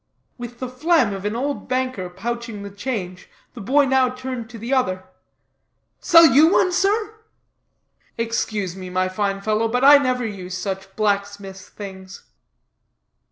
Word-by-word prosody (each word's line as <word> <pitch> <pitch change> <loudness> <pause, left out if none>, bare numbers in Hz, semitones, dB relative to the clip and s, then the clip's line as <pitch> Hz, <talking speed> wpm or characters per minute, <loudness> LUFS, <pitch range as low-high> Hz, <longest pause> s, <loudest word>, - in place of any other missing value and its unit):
With 240 0 -8
the 255 - -4
phlegm 255 -3 +1
of 195 0 -7
an 210 +2 -2
old 280 +4 -3
banker 255 -8 -2
pouching 225 +2 -5
the 200 - -8
change, 200 -4 -5 0.2
the 235 - -9
boy 275 +8 +3
now 265 -1 +3
turned 255 -2 -6
to 235 - -10
the 235 +5 -4
other: 185 -8 0 1.0
"Sell 335 0 +7
you 315 +2 +6
one, 370 - +3
sir?" 420 +4 0 1.0
"Excuse 215 -5 -2
me, 185 -1 -8
my 185 0 0
fine 195 +1 -2
fellow, 215 +2 0
but 250 +3 -1
I 285 +1 +9
never 255 -3 -1
use 185 -4 -6
such 195 0 -5
blacksmiths' 200 -2 -3
things." 190 -1 -10
225 Hz, 150 wpm, -21 LUFS, 195-260 Hz, 1.0 s, I